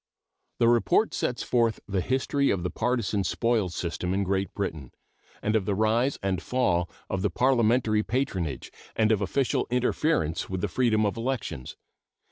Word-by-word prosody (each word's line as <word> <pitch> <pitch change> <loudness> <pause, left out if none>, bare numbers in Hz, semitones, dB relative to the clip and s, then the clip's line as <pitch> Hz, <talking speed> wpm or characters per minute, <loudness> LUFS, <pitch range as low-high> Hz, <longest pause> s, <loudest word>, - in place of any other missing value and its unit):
The 115 - +3
report 120 - +3
sets 125 - -2
forth 115 -3 +1
the 95 -2 0
history 135 +4 +1
of 90 -3 0
the 90 - -2
partisan 115 -4 0
spoils 110 -1 0
system 90 +2 -2
in 100 - +1
Great 95 0 -1
Britain, 80 -10 -4 0.5
and 105 +1 +1
of 105 -4 +1
the 100 - +1
rise 115 +6 +2
and 95 -3 0
fall 90 -9 0 0.2
of 95 - -2
the 105 - +1
parliamentary 115 -1 +2
patronage, 95 - -2 0.2
and 110 0 +3
of 105 -2 +2
official 125 +7 0
interference 125 - 0
with 95 -1 -3
the - - 0
freedom 110 -4 +2
of 105 +3 -1
elections. 115 - -4
110 Hz, 160 wpm, -27 LUFS, 95-125 Hz, 0.5 s, The